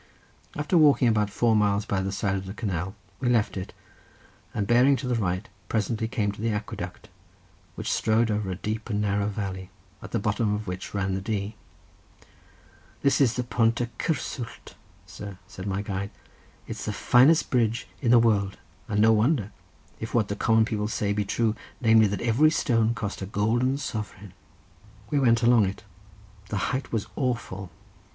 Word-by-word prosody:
After 150 Hz, +4 st, +2 dB
walking 145 Hz, -4 st, +5 dB
about 105 Hz, -2 st, +2 dB
four 115 Hz, +2 st, +2 dB
miles 105 Hz, -1 st, +2 dB
by 100 Hz, -3 st, 0 dB
the 95 Hz, +1 st, -2 dB
side 100 Hz, 0 st, -1 dB
of 95 Hz, -1 st, -3 dB
the 95 Hz, -, -7 dB
canal 95 Hz, -1 st, -3 dB, 0.2 s
we 125 Hz, -, 0 dB
left 115 Hz, -4 st, +2 dB
it, 95 Hz, 0 st, -5 dB, 0.8 s
and 105 Hz, -, -1 dB
bearing 125 Hz, +5 st, +5 dB
to 125 Hz, 0 st, -4 dB
the 125 Hz, -, +1 dB
right 95 Hz, -3 st, -1 dB, 0.2 s
presently 110 Hz, 0 st, 0 dB
came 110 Hz, -3 st, -1 dB
to 100 Hz, -, -10 dB
the 115 Hz, -, 0 dB
aqueduct, 105 Hz, -1 st, -5 dB, 0.7 s
which -, -, -3 dB
strode 110 Hz, +1 st, +2 dB
over 105 Hz, -2 st, -1 dB
a 95 Hz, -, -2 dB
deep 110 Hz, +4 st, -4 dB
and 105 Hz, -2 st, 0 dB
narrow 100 Hz, 0 st, +1 dB
valley, 95 Hz, -3 st, -4 dB, 0.3 s
at -, -, -8 dB
the -, -, -1 dB
bottom 105 Hz, 0 st, 0 dB
of 105 Hz, +1 st, -5 dB
which 90 Hz, +1 st, -6 dB
ran 95 Hz, -1 st, 0 dB
the 95 Hz, -, -2 dB
Dee. 105 Hz, +1 st, -3 dB, 1.5 s
"This 140 Hz, +1 st, +3 dB
is 120 Hz, -4 st, +3 dB
the 125 Hz, -, -1 dB
Pont 115 Hz, -1 st, +1 dB
y 120 Hz, -1 st, -1 dB
Cysswllt, 130 Hz, -6 st, -4 dB, 0.3 s
sir," 100 Hz, -3 st, -9 dB
said 95 Hz, +2 st, -8 dB
my 100 Hz, +1 st, -1 dB
guide; 100 Hz, -1 st, -3 dB, 0.6 s
"it's -, -, -6 dB
the -, -, -2 dB
finest 140 Hz, +7 st, +4 dB
bridge 115 Hz, -2 st, +1 dB
in 125 Hz, -, +1 dB
the 120 Hz, -, +7 dB
world, 105 Hz, -4 st, +2 dB, 0.3 s
and 105 Hz, -1 st, +2 dB
no 110 Hz, +1 st, +6 dB
wonder, 110 Hz, -1 st, +2 dB, 0.5 s
if 110 Hz, -, -5 dB
what 110 Hz, -3 st, +2 dB
the 100 Hz, -, -1 dB
common 110 Hz, +1 st, +3 dB
people 105 Hz, -2 st, -2 dB
say 105 Hz, -1 st, -1 dB
be 105 Hz, 0 st, -1 dB
true, 110 Hz, +2 st, 0 dB, 0.2 s
namely 110 Hz, -2 st, +5 dB
that 100 Hz, 0 st, -3 dB
every 120 Hz, +7 st, +4 dB
stone 115 Hz, -6 st, +1 dB
cost 105 Hz, -2 st, -4 dB
a 95 Hz, -, -4 dB
golden 120 Hz, +6 st, +1 dB
sovereign." 105 Hz, -7 st, -6 dB, 0.8 s
We 145 Hz, -, +2 dB
went 115 Hz, -3 st, +3 dB
along 115 Hz, -4 st, +5 dB
it; 95 Hz, -, -6 dB, 0.7 s
the 105 Hz, -, -2 dB, 0.2 s
height 130 Hz, +2 st, -3 dB
was 110 Hz, -3 st, -1 dB
awful. 115 Hz, -8 st, -2 dB
110 Hz, 180 wpm, -26 LUFS, 100-120 Hz, 1.5 s, the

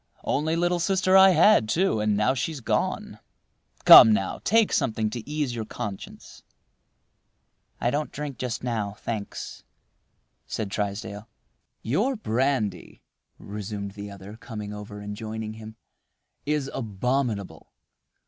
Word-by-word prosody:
Only 155 Hz, +3 st, 0 dB
little 175 Hz, +1 st, +1 dB
sister 185 Hz, +2 st, +2 dB
I 190 Hz, 0 st, +9 dB
had, 185 Hz, -, +5 dB
too, 175 Hz, -, +1 dB
and 105 Hz, -1 st, +1 dB
now 105 Hz, +5 st, +2 dB
she's 140 Hz, +4 st, -3 dB
gone. 120 Hz, -, -2 dB, 0.7 s
Come 110 Hz, -, +11 dB
now! 95 Hz, -3 st, 0 dB
take 225 Hz, +1 st, +3 dB
something 110 Hz, -6 st, 0 dB
to 120 Hz, +2 st, -7 dB
ease 150 Hz, -4 st, -2 dB
your 115 Hz, -2 st, -3 dB
conscience." 105 Hz, -2 st, -8 dB, 1.4 s
"I 120 Hz, -, 0 dB
don't 150 Hz, +2 st, -2 dB
drink 145 Hz, -4 st, -6 dB
just 125 Hz, -2 st, -4 dB
now, 110 Hz, -5 st, -2 dB
thanks," 105 Hz, -1 st, -6 dB, 0.8 s
said 105 Hz, -3 st, -4 dB
Trysdale. 100 Hz, +1 st, -4 dB, 0.5 s
"Your 210 Hz, -, 0 dB
brandy," 125 Hz, -, -2 dB, 0.3 s
resumed 100 Hz, 0 st, -6 dB
the 100 Hz, +1 st, -8 dB
other, 100 Hz, +2 st, -11 dB
coming 105 Hz, -3 st, -7 dB
over 105 Hz, 0 st, -8 dB
and 105 Hz, 0 st, -6 dB
joining 110 Hz, 0 st, -6 dB
him, 110 Hz, 0 st, -11 dB, 0.7 s
"is 150 Hz, -2 st, 0 dB
abominable. 115 Hz, -1 st, -3 dB
110 Hz, 125 wpm, -25 LUFS, 105-145 Hz, 1.4 s, Come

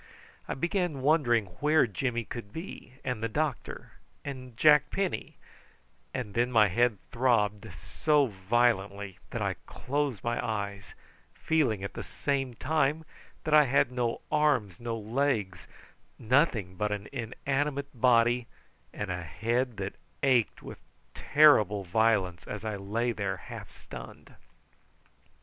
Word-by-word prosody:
I -, -, -3 dB
began 170 Hz, -1 st, -1 dB
wondering 130 Hz, -7 st, +3 dB
where 150 Hz, +1 st, +4 dB
Jimmy 120 Hz, +2 st, -2 dB
could 115 Hz, -2 st, -8 dB
be, 160 Hz, -, -8 dB
and 125 Hz, -4 st, -3 dB
the 115 Hz, -, -1 dB
doctor, 145 Hz, +2 st, -3 dB, 0.3 s
and 130 Hz, -4 st, -7 dB
Jack 150 Hz, 0 st, +6 dB
Penny, 195 Hz, -2 st, -3 dB, 0.7 s
and 120 Hz, -6 st, -4 dB
then 120 Hz, +3 st, +1 dB
my 110 Hz, -4 st, +5 dB
head 120 Hz, +3 st, +2 dB
throbbed 110 Hz, -4 st, +1 dB
so 150 Hz, -, +1 dB
violently 100 Hz, -2 st, 0 dB
that -, -, -3 dB
I -, -, -1 dB
closed 140 Hz, -5 st, -2 dB
my 120 Hz, 0 st, -1 dB
eyes, 100 Hz, -4 st, -4 dB, 0.4 s
feeling 125 Hz, -11 st, +1 dB
at 100 Hz, -, -5 dB
the -, -, -5 dB
same 135 Hz, -3 st, -2 dB
time 150 Hz, +4 st, 0 dB, 0.4 s
that 155 Hz, -, -1 dB
I 150 Hz, -1 st, +8 dB
had 135 Hz, -1 st, +2 dB
no 120 Hz, -2 st, -1 dB
arms, 145 Hz, -, +2 dB
no 115 Hz, -1 st, -3 dB
legs, 110 Hz, -5 st, -1 dB, 0.5 s
nothing 110 Hz, -, +1 dB
but 105 Hz, +1 st, -1 dB
an 105 Hz, 0 st, -4 dB
inanimate 140 Hz, +3 st, -2 dB
body, 120 Hz, -1 st, +3 dB, 0.4 s
and 105 Hz, -3 st, -4 dB
a 90 Hz, 0 st, -3 dB
head 115 Hz, -, -1 dB
that 95 Hz, 0 st, -5 dB, 0.3 s
ached 130 Hz, -5 st, +2 dB
with -, -, -9 dB, 0.3 s
terrible 110 Hz, -10 st, +5 dB
violence 95 Hz, -2 st, +1 dB
as 105 Hz, +1 st, -6 dB
I 110 Hz, -1 st, -2 dB
lay 110 Hz, +5 st, -1 dB
there 100 Hz, -4 st, -2 dB
half -, -, -9 dB
stunned. -, -, -11 dB
120 Hz, 130 wpm, -29 LUFS, 105-140 Hz, 0.7 s, I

